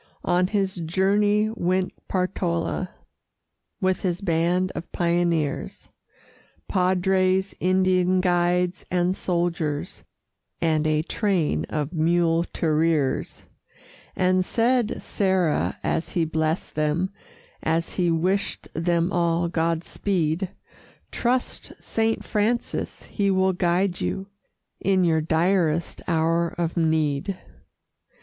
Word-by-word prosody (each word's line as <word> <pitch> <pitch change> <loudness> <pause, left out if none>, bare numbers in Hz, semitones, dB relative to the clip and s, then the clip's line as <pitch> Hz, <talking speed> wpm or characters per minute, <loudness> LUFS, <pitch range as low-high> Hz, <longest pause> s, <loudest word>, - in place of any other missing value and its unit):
On 180 +1 +2
his 195 -2 -1
journey 205 +5 +2
went 185 -3 0
Portala 180 -1 -1 0.9
With 185 -2 +1
his 180 -2 -1
band 180 0 +1
of - - -7
pioneers, 170 -4 -1 0.8
Padres, 185 +1 +2
Indian 185 0 +3
guides, 180 0 +1
and 180 +1 +1
soldiers, 170 -5 -2 0.6
And 155 -2 +1
a 155 0 +1
train 170 - 0
of 150 - -3
muleteers; 165 -2 +1 0.7
And 185 0 +2
said 240 +2 +1
Serra, 185 -6 +1
as 160 - -1
he 170 -2 +1
blessed 160 +1 -1
them, 155 +5 0 0.5
As 165 +1 0
he 175 -2 +2
wished 185 +5 -1
them 170 +2 +1
all 170 0 +1
Godspeed: 170 +1 -1 0.6
"Trust 245 +1 -1
Saint 225 0 -1
Francis 225 +3 -1
he 200 -2 -1
will 190 0 +2
guide 180 +1 +1
you 195 +1 -3 0.5
In 190 -1 +2
your 160 -2 +3
direst 165 0 +1
hour 165 0 +2
of 170 -1 -1
need." 160 +1 0
175 Hz, 100 wpm, -24 LUFS, 165-190 Hz, 0.9 s, Indian